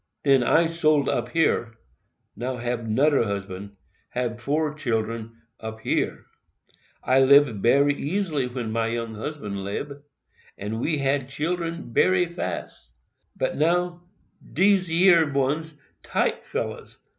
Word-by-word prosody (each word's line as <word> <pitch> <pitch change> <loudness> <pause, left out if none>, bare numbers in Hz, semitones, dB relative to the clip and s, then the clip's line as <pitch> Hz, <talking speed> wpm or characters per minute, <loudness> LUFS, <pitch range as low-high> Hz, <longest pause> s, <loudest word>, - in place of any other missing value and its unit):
Den 135 -2 +5
I 165 +7 +4
sold 155 -3 +2
up 120 0 -1
here—now 120 - -3
hab 120 -1 -3
'noder 135 +5 +3
husband—hab 100 +4 -6
four 150 +4 0
children 115 -5 -3 0.3
up 110 0 -7
here. - - -1 0.8
I 130 +1 +3
lib 135 -6 +5
bery 140 +5 +4
easy 150 -3 -1
when 120 -3 -4
my 115 0 0
young 115 -1 -3
husband 105 -5 -5
'libe—and 115 -2 -7
we 155 +2 0
had 135 -1 0
children 165 -2 -3
bery 185 +7 +4
fast. 90 - -6 0.4
But - - -1
now 175 +3 +1 0.4
dese 190 -1 +2
yer 165 -2 +5
ones 145 +4 -1 0.3
tight - - -1
fellers. - - -5
135 Hz, 115 wpm, -25 LUFS, 115-155 Hz, 0.8 s, Den